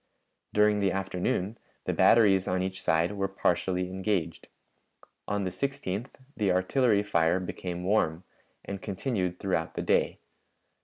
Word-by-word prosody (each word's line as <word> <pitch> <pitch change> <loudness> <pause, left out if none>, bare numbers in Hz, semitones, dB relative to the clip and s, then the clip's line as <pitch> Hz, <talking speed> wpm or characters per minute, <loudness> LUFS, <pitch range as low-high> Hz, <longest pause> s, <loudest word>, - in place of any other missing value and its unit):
During 105 0 +3
the 100 -1 +2
afternoon 95 +2 -2 0.3
the - - 0
batteries 100 -5 +5
on 90 0 0
each 95 0 -4
side 80 +2 +2
were 100 -1 -1
partially 90 -1 0
engaged. 95 -3 -2 0.8
On 105 -1 -1
the 95 - -2
16th 125 -2 -3 0.3
the 100 -4 +1
artillery 105 +4 +2
fire 85 -2 +2
became 90 -1 -5
warm, 90 -4 +1 0.4
and 100 -1 -5
continued 95 -3 -2
throughout 90 -4 -2
the - - -2
day. - - +2
95 Hz, 135 wpm, -28 LUFS, 90-105 Hz, 0.8 s, batteries